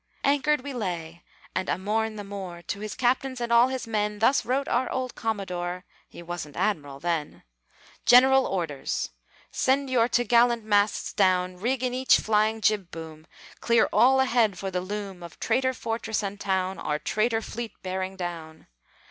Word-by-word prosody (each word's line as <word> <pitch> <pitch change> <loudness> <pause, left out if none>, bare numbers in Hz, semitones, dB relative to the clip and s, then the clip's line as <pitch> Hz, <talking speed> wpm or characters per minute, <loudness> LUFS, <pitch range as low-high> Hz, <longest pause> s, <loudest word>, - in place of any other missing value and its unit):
Anchored 290 +1 +2
we 280 +1 -6
lay, 175 -7 -4 0.3
and 185 - -2
a - - +1
morn 215 +3 -1
the 205 - -6
more, 190 -4 -7
To 200 - -4
his 215 -1 -5
captains 260 +1 0
and 235 -1 -1
all 235 +2 +6
his 260 -1 -4
men 210 -2 -1
Thus 230 +6 +3
wrote 270 +3 -1
our 250 +1 0
old 255 -1 -3
commodore 180 -5 -3 0.2
(He 170 - -11
wasn't 170 -4 -6
Admiral 145 -9 -1
then): 165 -2 -3 0.6
"GENERAL 265 +2 +7
ORDERS: 165 -7 -3 0.4
Send 270 +1 +1
your 235 -2 +3
to'gallant 240 -1 +3
masts 205 -1 +1
down, 185 -2 +2
Rig 245 +6 -1
in 250 -1 0
each 260 +1 +4
flying 220 +1 +1
jib 210 -5 +1
boom! 160 -1 -9 0.3
Clear 235 -1 +3
all 265 +2 +5
ahead 235 -7 +2
for 195 +1 -4
the 180 -1 -1
loom 195 -1 -6
Of 170 -1 -11
traitor 260 0 +1
fortress 225 -2 -2
and 200 0 -4
town, 190 -1 -1
Or 150 - -1
traitor 225 +6 0
fleet 230 -1 -6
bearing 190 0 -3
down. 170 -3 -7
210 Hz, 165 wpm, -26 LUFS, 180-245 Hz, 0.6 s, GENERAL